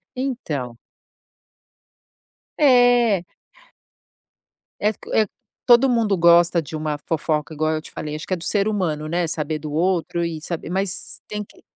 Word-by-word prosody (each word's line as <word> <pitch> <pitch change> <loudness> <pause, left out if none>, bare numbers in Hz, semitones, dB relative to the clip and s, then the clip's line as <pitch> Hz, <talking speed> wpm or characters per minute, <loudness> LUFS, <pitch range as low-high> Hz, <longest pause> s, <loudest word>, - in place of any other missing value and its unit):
Então 160 - -4 1.8
É. 245 - +4 1.6
É, 210 +1 +2
co - - -12
eh, 220 - +3 0.4
todo 245 +2 +6
mundo 225 -5 +2
gosta 170 0 +5
de 160 +2 -10
uma 155 -1 -2
fofoca 155 -1 -1
igual 155 +1 0
eu 155 - -3
te - - -12
falei, 150 0 -5
acho 155 - -8
que - - -6
é - - +2
do 170 - -9
ser 205 -1 +1
humano, 165 -8 -1
né, 175 +1 0
saber 155 -1 -2
do 150 0 -7
outro 170 +1 0
e 165 -2 -4
saber 165 +1 -5
mas 190 0 0
tem 210 0 -4
que - - -20
170 Hz, 155 wpm, -22 LUFS, 155-210 Hz, 1.8 s, todo